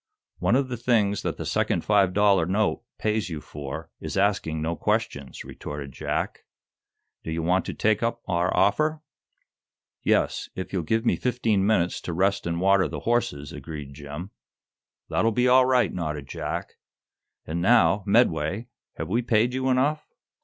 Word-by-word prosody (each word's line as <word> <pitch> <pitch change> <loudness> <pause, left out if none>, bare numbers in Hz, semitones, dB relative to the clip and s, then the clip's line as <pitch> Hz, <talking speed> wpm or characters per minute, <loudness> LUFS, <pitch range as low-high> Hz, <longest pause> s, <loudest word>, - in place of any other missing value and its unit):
"One - - +2
of 135 0 +2
the 120 - -3
things 110 -4 +1
that - - -3
the - - -5
second - - 0
five 100 -3 +4
dollar 100 -3 +3
note 100 +3 +1 0.2
pays 105 -4 -1
you 80 -3 -4
for 75 +2 -7
is - - -5
asking 95 -5 +1
no 80 +2 -1
questions," 70 -3 -2
retorted 70 -1 -7
Jack. - - -3 0.8
"Do - - -6
you 80 0 -2
want 90 +3 +2
to - - -5
take 110 -1 +2
up 115 0 -1
our 90 0 +1
offer?" 155 +11 +2 1.0
"Yes; - - +1
if 95 - -6
you'll 95 - 0
give 110 +9 0
me - - +2
fifteen 115 -6 +1
minutes 90 -5 +1
to 85 - -4
rest 95 +2 +1
and 85 0 -1
water 95 -1 +4
the 75 -2 -6
horses," 75 - -1
agreed 75 -3 -7
Jim. 75 +7 -8 0.8
"That'll 115 - +1
be 125 +3 +2
all 130 0 +6
right," 130 -1 +3
nodded 75 -5 -4
Jack. - - -5 0.7
"And 85 +2 -3
now, 105 -1 +4
Medway, 100 0 +2 0.3
have - - -4
we 115 +6 +1
paid 115 +1 +2
you 130 0 0
enough?" 135 +4 +1
100 Hz, 165 wpm, -25 LUFS, 80-115 Hz, 1.0 s, all